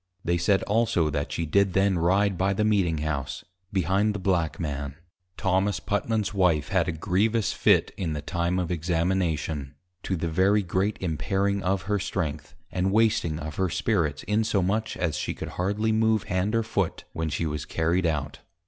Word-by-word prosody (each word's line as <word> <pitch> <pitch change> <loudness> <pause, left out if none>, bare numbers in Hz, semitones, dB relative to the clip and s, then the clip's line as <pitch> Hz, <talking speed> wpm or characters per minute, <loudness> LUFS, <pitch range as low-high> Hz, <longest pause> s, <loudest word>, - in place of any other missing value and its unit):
They 85 0 +1
said 95 +3 +2
also, 100 -8 +1
that 70 0 -2
she 85 - -2
did 100 +4 +2
then 95 -2 +2
ride 95 +4 +2
by 95 +2 +1
the 105 - 0
Meeting 95 -7 +2
House, 70 -3 -3 0.3
behind 100 +3 +1
the - - -3
Black 90 -4 0
Man. 70 -3 -4 0.4
Thomas 95 +2 +1
Putman's 105 0 -1
Wife 90 -7 +2
had 95 -4 +2
a - - +1
grievous 100 +7 +1
Fit - - +3
in 85 -4 -2
the 75 - -4
time 85 +3 -1
of 90 -1 -1
Examination, 80 -4 -1 0.3
to 95 - -2
the 85 0 -2
very 95 +5 +3
great 95 +3 0
impairing 95 +4 0
of 95 -2 0
her 105 +3 0
strength, 75 -6 -3 0.2
and 95 +1 0
wasting 110 -7 +2
of 75 0 -6
her 95 -1 +1
spirits, 80 -6 0
insomuch 105 0 0
as 85 -3 -1
she - - -3
could - - -6
hardly 105 +4 -1
move 110 -1 +2
hand 95 +4 -1
or 115 - +2
foot - - -2
when 80 -1 -2
she 80 +3 -2
was 75 -2 -3
carried 85 +2 +1
out. 75 -3 -2
90 Hz, 175 wpm, -26 LUFS, 80-100 Hz, 0.4 s, Fit